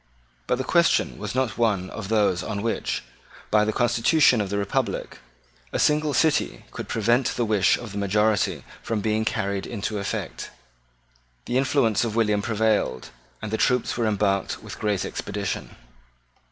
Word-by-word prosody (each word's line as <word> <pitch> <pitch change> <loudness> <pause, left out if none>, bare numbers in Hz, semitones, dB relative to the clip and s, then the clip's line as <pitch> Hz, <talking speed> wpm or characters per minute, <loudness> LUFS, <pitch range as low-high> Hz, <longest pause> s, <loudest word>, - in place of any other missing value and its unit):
But 125 - +1
the 130 - -2
question 170 +4 +2
was 105 +2 -5
not 130 -3 -1
one 100 -6 +1
of 110 -4 -6
those 100 -5 +2
on 100 +2 -4
which, 115 - -2 0.5
by 105 0 +5
the 110 - +1
constitution 120 +2 +3
of 100 - -3
the 100 - -1
republic, 100 -1 -2 0.5
a - - -1
single 150 -1 +2
city 160 +4 +1
could - - -6
prevent 115 +3 +1
the 120 - 0
wish 105 -4 +3
of 115 -4 -8
the 100 - -4
majority 105 +1 +1 0.2
from 110 -2 -2
being 110 +1 0
carried 100 -3 -2
into 105 -2 -3
effect. 100 - -4 1.0
The 125 - +1
influence 130 -6 +2
of 110 -2 -2
William 105 -3 +2
prevailed; 110 - 0 0.3
and 105 - -4
the 110 - 0
troops 125 -1 +2
were 115 -2 0
embarked 100 -2 0
with - - -9
great 105 -3 0
expedition. 100 -11 -4
110 Hz, 160 wpm, -24 LUFS, 100-120 Hz, 1.0 s, by